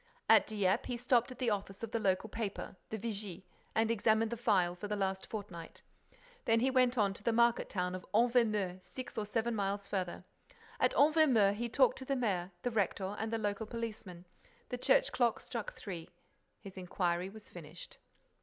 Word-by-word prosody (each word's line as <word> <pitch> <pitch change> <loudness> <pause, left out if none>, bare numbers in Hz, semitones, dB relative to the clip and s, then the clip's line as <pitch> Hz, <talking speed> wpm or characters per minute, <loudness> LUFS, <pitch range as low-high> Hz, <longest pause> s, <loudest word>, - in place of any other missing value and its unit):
At - - +6
Dieppe, 200 -3 +1
he 245 - -2
stopped 245 +1 +2
at 255 - -9
the 240 -3 0
office 195 0 -4
of 225 - -4
the 230 - 0
local 195 0 +1
paper, 215 -3 -4
the 220 - -3
Vigie, 205 -4 -5 0.3
and 225 +1 +3
examined 220 0 +2
the - - -1
file 185 -6 +2
for 180 +4 -6
the 210 - -1
last 190 -1 -2
fortnight. 185 -6 -7 0.6
Then 225 0 +4
he 260 +3 +2
went 255 -1 +3
on 200 -3 +3
to 200 - -9
the 230 - +1
market 235 +1 +3
town 180 -1 -1
of 185 - -5
Envermeu, 215 -5 +2
six 255 -2 -8
or 215 -2 -2
seven 230 +2 0
miles 200 -1 -2
farther. 185 -2 -3 0.6
At - - +2
Envermeu, 285 -10 +5
he 235 +3 -3
talked - - +3
to 260 - -7
the 275 - 0
mayor, 195 -8 0
the 245 - 0
rector 200 -2 -1
and 220 0 -2
the 225 - 0
local 210 0 -2
policeman. 215 -6 -6 0.4
The 250 - -4
church - - +3
clock 240 -3 +2
struck 235 -4 -5
three. 175 -5 -7 0.5
His 195 -2 -11
inquiry 180 -1 -1
was 215 +1 -13
finished. 170 0 -11
215 Hz, 190 wpm, -33 LUFS, 195-235 Hz, 0.6 s, At